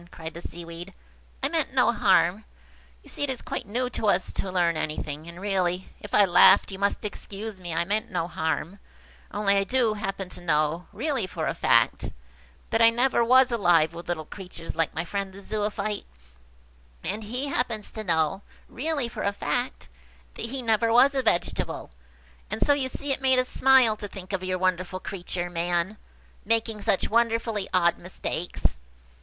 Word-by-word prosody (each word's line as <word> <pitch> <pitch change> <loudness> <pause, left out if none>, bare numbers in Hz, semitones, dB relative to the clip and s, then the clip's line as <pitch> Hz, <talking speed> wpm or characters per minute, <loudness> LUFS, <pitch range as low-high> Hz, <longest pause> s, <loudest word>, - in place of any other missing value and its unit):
cried 160 -2 -8
the 170 - -8
Seaweed. 170 +3 -8 0.5
"I - - +4
meant 310 -4 -1
no 250 - +5
harm. 190 -2 +3 0.6
You - - -16
see - - -7
it 285 - +1
is 260 -2 -3
quite - - -5
new 245 +5 -1
to 220 - -2
us - - +1
to 190 - -3
learn 175 -2 +2
anything; 155 0 -4
and, 170 +1 -9
really, 185 -2 -1
if 205 - -4
I 205 - +7
laughed, 190 +2 +6
you 190 - -7
must 200 +1 0
excuse 205 -1 -6
me. 175 -1 -5
I 170 +1 +1
meant 210 +4 -1
no 175 -2 -1
harm–only 195 +4 -3
I 195 - +3
do 240 0 +1
happen 195 -2 -4
to - - -9
know–really 175 - 0
for 180 - -4
a - - 0
fact–that 65 - 0
I 230 - +8
never 240 +1 +2
was 255 +2 +5
alive 175 -8 +3
with 170 +1 -9
little 160 -3 -2
creatures 180 -2 -8
like 165 -1 0
my 160 +2 -2
friend 195 +1 -3
the 195 - -10
Zoophyte; 210 0 -3 1.0
and 220 - -3
he 250 +6 -3
happens 230 -6 -1
to 220 - -5
know–really 205 - -1
for 235 - -7
a 200 - +1
fact–that 245 +1 -5
he 260 +2 -5
never 225 0 +2
was 255 +4 +6
a 270 - +1
vegetable; 215 -8 -1 0.6
and - - 0
so 290 - +5
you 275 -2 0
see 280 +2 -4
it 265 - -1
made 260 -1 +4
us 255 0 +2
smile 260 -4 +5
to 205 - -6
think 195 -1 -8
of 190 -1 -1
your 185 0 -1
wonderful 185 0 0
creature, 180 -2 -4
man, 175 +3 -1 0.4
making 225 0 0
such 195 - +2
wonderfully 230 -2 +1
odd 175 -2 +3
mistakes." 175 - -3
200 Hz, 170 wpm, -26 LUFS, 175-230 Hz, 1.0 s, I